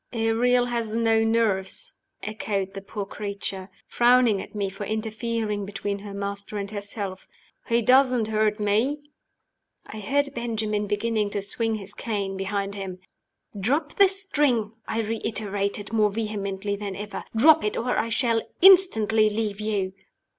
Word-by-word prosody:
"Ariel 240 +2 +2
has 235 -3 -2
no 225 -1 +3
nerves," 225 - 0 0.3
echoed 200 -2 -3
the 195 - -6
poor 200 +1 -5
creature, 200 -1 -5 0.2
frowning 240 -4 +4
at - - -11
me 200 -1 0
for 195 +2 -6
interfering 220 0 -2
between 200 0 -4
her 205 0 -8
master 200 +1 -4
and 200 0 -4
herself. 200 -2 -5 0.4
"He 235 0 +2
doesn't 250 -2 +4
hurt 215 0 +1
me." 215 +8 +1 0.9
I 215 - -8
heard 280 +7 0
Benjamin 220 -3 -2
beginning 210 0 0
to 205 0 -2
swing 225 +2 -1
his 200 -1 -7
cane 200 -4 -3
behind 195 +1 -2
him. 190 -2 -6 0.6
"Drop 285 - 0
the 395 -1 +7
string!" 295 - +1 0.2
I 225 - -1
reiterated, 210 -1 -3
more 215 -2 +4
vehemently 200 -2 -3
than 200 -1 -5
ever. 205 +1 -6
"Drop 310 +7 +6
it, 210 - -1
or 245 +2 0
I 230 - 0
shall 230 -1 +1 0.2
instantly 225 - +6
leave 210 -1 -2
you." 200 -3 -1
215 Hz, 145 wpm, -25 LUFS, 200-230 Hz, 0.9 s, the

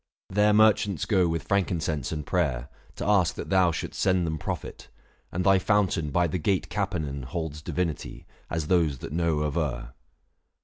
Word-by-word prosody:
There 105 +2 +4
merchants 105 -4 +3
go 95 -5 +3
With 80 0 -2
frankincense 80 -8 0
and 75 -2 -4
prayer, 70 -8 -1 0.3
to - - -4
ask 100 -4 +3
that - - -6
thou 95 -2 +4
Shouldst 80 - -5
send 95 -2 +2
them 80 -1 -2
profit; - - -6 0.4
and 90 - -1
thy 95 0 +5
fountain 95 -6 +1
by 85 +4 +2
The 90 +2 -2
gate 95 +4 0
Capenan 85 -9 -2
holds 75 +2 -5
divinity, 85 -1 -3 0.2
As 80 -2 -2
those 80 -5 +2
that 65 - -7
know 80 -2 +1
aver. 65 -6 -2
85 Hz, 165 wpm, -27 LUFS, 75-95 Hz, 0.4 s, thy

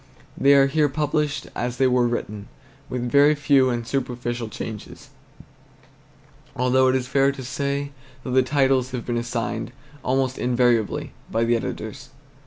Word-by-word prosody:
They 140 +1 +5
are 135 -1 +6
here 150 +1 +2
published 150 +1 -1
as 120 0 -3
they 135 - +3
were 125 -1 +3
written, 105 -3 -4 0.4
with 125 -1 -3
very 145 +4 +5
few 140 -3 +3
and 120 -2 -2
superficial 120 -3 -3
changes; 110 0 -8 1.5
although 125 +1 +3
it 130 - +3
is 130 -1 0
fair 135 +1 +3
to 135 -1 -8
say 140 +2 -3 0.3
that 130 - -5
the 130 +1 +5
titles 130 -1 +2
have 125 -2 -4
been 120 -1 -1
assigned, 120 -1 -3 0.3
almost 130 0 0
invariably, 120 -3 +1 0.2
by 115 - 0
the 120 +1 +2
editors. 115 - -5
130 Hz, 150 wpm, -23 LUFS, 120-135 Hz, 1.5 s, are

